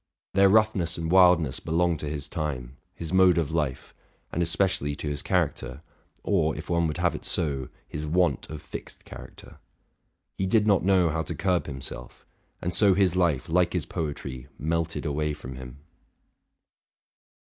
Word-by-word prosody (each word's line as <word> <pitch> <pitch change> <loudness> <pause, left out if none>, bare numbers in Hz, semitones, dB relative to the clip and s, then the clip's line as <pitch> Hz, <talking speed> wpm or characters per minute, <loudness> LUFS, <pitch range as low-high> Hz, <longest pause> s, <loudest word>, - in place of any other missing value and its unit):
Their 100 0 +5
roughness 100 -5 +2
and 80 0 -3
wildness 90 -7 +5
belong 85 +1 +1
to 75 0 -5
his 75 -2 -4
time, 70 -6 -4 0.2
his 85 +1 -5
mode 95 -1 +5
of 80 -4 0
life, 75 -5 -2 0.4
and 85 - -1
especially 85 -4 0
to 75 - -6
his 75 -1 0
character, 75 - -1 0.4
or, 80 -7 +1
if - - -7
one 85 -1 +2
would 75 0 -3
have 85 0 +1
it - - -7
so, 70 -7 -1 0.2
his 75 - -5
want 90 +3 +1
of 75 -1 -7
fixed - - -9
character. - - -12 0.8
He 95 - +1
did 105 +2 +3
not 100 -5 +3
know 90 -3 +3
how 80 +1 -1
to - - -5
curb 90 -2 0
himself; 65 -3 -7 0.4
and 90 - -1
so 95 +1 +5
his 95 -3 +2
life, 85 -7 +1
like 90 +1 +2
his 90 -5 -1
poetry, 70 -6 -5
melted 85 +2 -2
away 75 +1 -1
from 65 -2 -9
him. 65 +1 -9
85 Hz, 165 wpm, -26 LUFS, 75-90 Hz, 0.8 s, Their